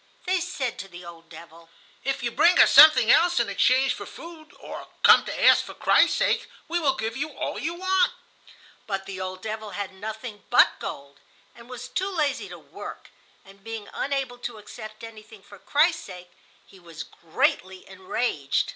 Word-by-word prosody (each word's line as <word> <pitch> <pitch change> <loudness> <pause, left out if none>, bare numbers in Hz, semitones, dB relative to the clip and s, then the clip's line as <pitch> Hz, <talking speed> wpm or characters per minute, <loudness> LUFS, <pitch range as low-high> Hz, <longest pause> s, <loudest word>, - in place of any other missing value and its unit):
They 370 0 +1
said 305 -9 -4
to 195 - -7
the 175 -1 -12
old 165 -1 -13
devil: 165 0 -14 0.3
"If 270 -2 -2
you 235 - -1
bring 350 +9 +4
us - - +7
something 305 -7 +8
else 350 0 +4
in - - 0
exchange 265 +1 +2
for - - -9
food, 330 -2 -12
or - - -9 0.2
come - - +7
to - - -4
ask - - +6
for - - -11
Christ's - - +3
sake, - - 0 0.2
we 345 +1 -1
will 275 -5 +1
give 225 -2 -4
you 300 +4 -3
all 285 - -5
you 335 +3 -3
want." 375 0 +2 0.8
But 195 -2 -3
the 190 -1 -7
old 185 0 -6
devil 220 -1 -5
had 200 -1 -5
nothing 215 +1 -8
but 245 - +4
gold, 140 0 -8 0.3
and 235 +1 -16
was 250 0 -8
too 370 +10 -2
lazy 305 -7 -2
to - - -9
work; - - -11 0.3
and 195 0 -18
being 225 -1 -7
unable 270 -3 -3
to 240 -2 -6
accept 215 +1 -11
anything 220 -2 -12
for 200 -1 -15
Christ's 330 - +1
sake, 180 -2 -11 0.3
he 190 - -18
was 165 -3 -9
greatly 185 +3 -2
enraged. 185 - -2
225 Hz, 180 wpm, -25 LUFS, 190-285 Hz, 0.8 s, something